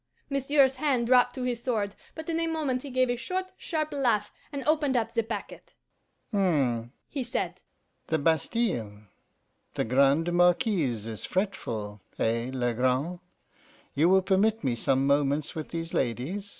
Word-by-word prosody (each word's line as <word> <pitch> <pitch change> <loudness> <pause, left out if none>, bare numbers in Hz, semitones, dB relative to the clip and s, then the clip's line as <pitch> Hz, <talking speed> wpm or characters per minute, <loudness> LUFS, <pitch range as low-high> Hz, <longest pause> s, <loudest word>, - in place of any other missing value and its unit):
Monsieur's 275 -1 +3
hand 265 -4 +1
dropped 250 0 +4
to 255 - -4
his 245 -2 -2
sword, 215 -6 -1 0.2
but 320 -1 -7
in 330 -1 0
a 330 - 0
moment 295 -6 -1
he 280 - -8
gave 255 0 +2
a 245 - 0
short, 370 +9 -3
sharp 310 -4 -3
laugh, 245 -7 +1 0.2
and 280 -2 -4
opened 300 -4 +2
up 225 -1 0
the 230 - +2
packet. 225 - -7 0.6
'H'm,' 135 - +1 0.2
he 280 - -4
said, 245 -1 -3 0.5
'the 160 - +1
Bastile! 155 - 0 0.7
The - - 0
Grande 140 +7 +3
Marquise 175 - +2
is 110 -2 -5
fretful 110 - -3 0.2
eh, 115 +2 0
Legrand? 130 +6 0 0.7
You 160 +5 +3
will 190 0 +5
permit 210 +4 +2
me 125 -3 +1
some 135 +3 +1
moments 140 +1 +1
with 160 -3 -5
these 165 0 -5
ladies? 140 - -2
195 Hz, 150 wpm, -28 LUFS, -, 0.7 s, will